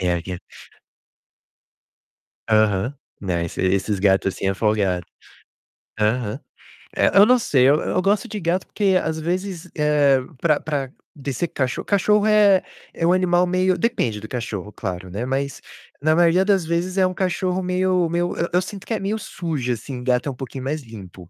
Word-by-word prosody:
É 90 -1 +1
aí, 85 - -3
eh 90 -2 -4 2.1
Aham. 110 +2 +2 0.3
Não, 90 -4 -1
esse 85 - -4
esses 95 +2 +1
gato 95 0 +3
assim 95 0 -2
é 95 - 0
folgado. 100 -5 0 0.9
Aham. 105 0 0 0.6
Eh, - - +3
eu 200 - +9
não 250 +3 +5
sei. 130 - +3
Eu 155 +5 +1
gosto 205 +4 +1
de 210 - -5
gato, 175 +2 0
porque, 195 -3 +2
às 160 0 -2
vezes, 180 +1 -3
eh, 150 -3 +3 0.2
para 155 -3 +3
para 140 -4 -3 0.2
de 140 -2 -5
ser 170 +8 -1
cachorro 130 -3 -2
cachorro 210 +1 +2
é 210 -3 +5 0.3
é 165 - -1
um 175 - +4
animal 180 -1 +3
meio 185 0 +1
depende 130 - -1
do 110 - -8
cachorro, 110 -5 -5
claro, 90 -1 -5
né, 105 +7 -4
mas 135 +1 -2 0.4
na 155 +1 +3
maioria 175 +2 +4
das 195 -4 +3
vezes 175 +3 -1
é 190 - +4
um 185 - -1
cachorro 185 0 -1
meio 180 -1 +1
meio, 175 +1 -1
eu 170 - 0
eu 180 - +4
sinto 195 +1 -8
que 230 - -2
é 215 - -1
meio 200 +3 -2
sujo, 150 - -3
assim, 125 +2 -7
gato 125 +2 0
é - - -2
um - - -9
pouquinho 130 0 -7
mais 150 +3 -2
limpo, 95 -7 -12
150 Hz, 180 wpm, -22 LUFS, 110-185 Hz, 2.1 s, eu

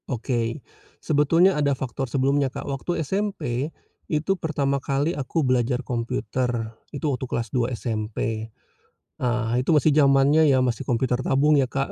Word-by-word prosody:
Oke, 120 0 -2 0.3
sebetulnya 165 +5 +3
ada 140 -4 +1
faktor 135 0 -4
sebelumnya, 135 +2 +1
Kak, - - -7
waktu 150 +4 -3
SMP, 155 - -2 0.4
itu 155 +4 +1
pertama 140 -4 -1
kali 140 +5 0
aku 145 +1 -1
belajar 125 0 +1
komputer, 120 -1 -2 0.2
itu 140 +1 -6
waktu 135 -3 -1
kelas 115 -1 -2
2 125 -1 +1
SMP. 110 0 -3 0.7
Ah, 120 -2 0
itu 125 - -3
masih 150 +1 +4
zamannya 145 +2 +5
ya, 130 -2 +4
masih 120 -3 -2
komputer 125 +1 +1
tabung 145 +3 +3
ya, 135 - +2
Kak. 135 +2 -2
135 Hz, 145 wpm, -24 LUFS, 120-145 Hz, 0.7 s, zamannya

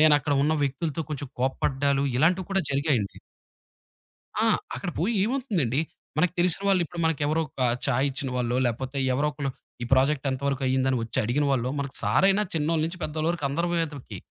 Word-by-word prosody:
నేనక్కడ 150 -2 +5
ఉన్న 150 +2 +2
వ్యక్తులతో 145 +3 -2
కొంచెం 145 -2 -4
కోప్పడ్డాలు 135 +2 +1
ఇలాంటివి 175 +7 +2
కూడా 195 0 +2
జరిగాయండి. 135 -7 0 1.3
ఆ! - - +3 0.3
అక్కడ 125 +8 -4
పోయి 205 +9 +1
ఏమవుతుందండి? 205 - 0 0.4
మనకు 165 +2 +2
తెలిసిన 180 +2 +4
వాళ్ళిప్పుడు 175 -3 +1
మనకెవరో 155 0 +1
ఒక 135 - -11 0.3
చాయిచ్చిన 135 +1 0
వాళ్ళో, 120 0 0
లేపోతే 130 +4 -3 0.2
ఎవరో 145 +3 +1
ఒకళ్ళు 140 -2 -3 0.3
ఈ - - -1
ప్రాజెక్ట్ 135 +2 +3
ఎంత 130 -1 -3
వరకు 135 -1 -1
అయిందని 130 0 +2
వచ్చి 115 - -3
అడిగిన 135 +6 +1
వాళ్ళో 125 -1 +1
మన 140 - -1 0.2
సారయినా 195 +2 +4
చిన్నోళ్ళ 160 0 +1
నుంచి 170 +3 -4
పెద్దవాళ్ళ 155 +1 -1
వరకు 170 -4 -3
అందరు 170 +5 -1
వేతలకి 145 -9 -5
145 Hz, 160 wpm, -26 LUFS, 130-165 Hz, 1.3 s, నేనక్కడ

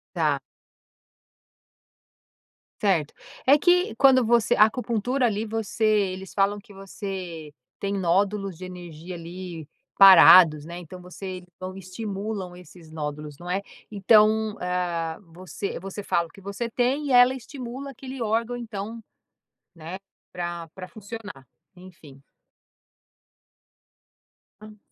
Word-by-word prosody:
Tá. - - +1 2.4
Certo. 175 -8 +1 0.3
É 280 +3 +6
que 355 -3 +3
quando 260 -2 +5
você 235 -1 +3
a 215 - +7
acupuntura 245 +2 -1
ali 215 -1 -1
você 225 0 -4
eles 195 -3 +1
falam 200 +1 +1
que 205 0 -17
você 190 -5 -7 0.3
tem 200 0 -2
nódulos 195 +1 0
de 185 - -9
energia 175 -1 -9
ali 170 -2 -8 0.3
parados, 180 -5 +9
né, 170 +2 -8
então 180 +1 -11
você 185 +1 -7 0.2
então 185 0 -7
estimulam 195 0 -5
esses 165 -2 -15
nódulos, 150 -1 -6
não 175 +2 -8
é 195 +2 -1 0.3
então, 215 +1 +3
hã, 175 -2 -2
você 185 +1 -6
você 195 +2 -7
fala 170 -1 0
o - - -25
que 195 - -16
você 200 +5 -5
tem 265 +5 0
e - - -3
ela 245 +1 +6
estimula 260 +1 -8
aquele 260 -1 -8
órgão 230 +2 -1
então 225 -1 -6 0.7
né? 165 +3 -8 0.3
Pra 175 -1 -5
pra 185 -1 -9
funcionar, 205 - -10 0.3
enfim. 165 -7 -15 2.4
Hã. 215 0 -13
195 Hz, 120 wpm, -25 LUFS, 175-225 Hz, 2.4 s, parados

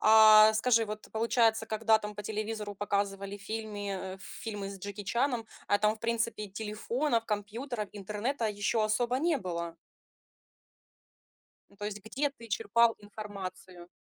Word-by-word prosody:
А 215 0 +9
скажи, 225 +1 +3
вот 215 0 -6
ты, - - -16
получается, 225 0 +2
когда 220 0 +3
там 210 -1 -6
по 210 - -6
телевизору 215 0 -3
показывали 200 0 -2
фильми 205 -1 -4 0.2
э, - - -13
фильмы 205 0 -6
с 195 -1 -8
Джеки 205 +2 -6
Чаном, 235 +3 0 0.2
а 205 - +3
там 215 +1 +2
в - - -27
принципе 230 -2 -1
телефонов, 225 +5 -1
компьютеров, 215 +2 -3
интернета 210 +6 -3
ещё 210 +2 0
особо 240 +3 +1
не 320 -1 +2
было. 170 -4 -4 2.0
То 205 - -5
есть 210 0 -4
где 275 +6 -1
ты 235 -4 -14
черпал 230 +2 +3
информацию? 195 -4 -8
215 Hz, 140 wpm, -31 LUFS, 205-230 Hz, 2.0 s, А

